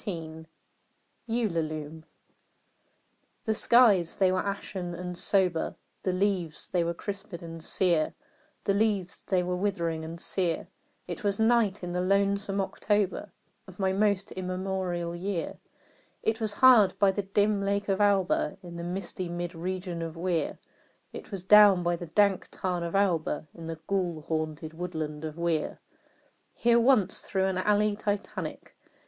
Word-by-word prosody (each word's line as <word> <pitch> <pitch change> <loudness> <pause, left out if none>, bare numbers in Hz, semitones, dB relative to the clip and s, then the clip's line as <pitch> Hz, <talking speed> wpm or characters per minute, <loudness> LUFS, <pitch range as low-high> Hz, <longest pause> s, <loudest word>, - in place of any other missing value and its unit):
ULALUME. 160 -9 -2 1.4
The 220 - +2
skies 215 -7 +4
they 190 -2 +3
were 185 0 0
ashen 190 -3 -4
and 180 0 -5
sober; 180 -2 +1 0.3
The 185 - 0
leaves 185 -4 -1
they 175 -2 +1
were 170 0 -2
crisped 200 -1 -6
and 165 -1 -8
sere 170 -4 +1 0.5
The 200 - +2
leaves 200 -3 0
they 185 -2 +1
were 180 0 -1
withering 170 -4 -1
and 165 +1 -7
sere; 175 -2 -1 0.4
It - - -6
was 200 -1 +1
night 220 -4 +3
in 175 - -4
the 180 +1 -1
lonesome 200 +1 +1
October 205 0 -1 0.4
Of 185 -1 -13
my 190 -1 +1
most 200 0 +1
immemorial 185 -2 -3
year; 180 -1 -3 0.6
It 220 +1 0
was 215 -2 0
hard 235 -4 +6
by 200 -1 +4
the 205 - -2
dim 205 +1 +1
lake 200 +1 -1
of 195 0 +1
Auber, 200 -3 +2
In 170 -1 -8
the 170 - -5
misty 180 0 -4
mid 175 +1 -4
region 180 0 -4
of 165 0 -5
Weir 170 -1 -1 0.6
It - - -9
was 195 -4 -6
down 200 -2 +7
by 175 0 +1
the 170 0 -7
dank 200 +3 +2
tarn 180 -2 -2
of 170 +2 -3
Auber, 170 -6 +1
In 165 -1 -9
the 165 -1 -5
ghoul 180 -5 -1
haunted 155 0 -3
woodland 160 -3 -5
of 155 0 -6
Weir. 170 -2 -1 0.8
Here 235 0 +4
once, 235 -5 +3
through 190 -1 +1
an 190 -1 0
alley 210 +1 +2
Titanic. 205 -2 -4
185 Hz, 150 wpm, -28 LUFS, 170-200 Hz, 1.4 s, down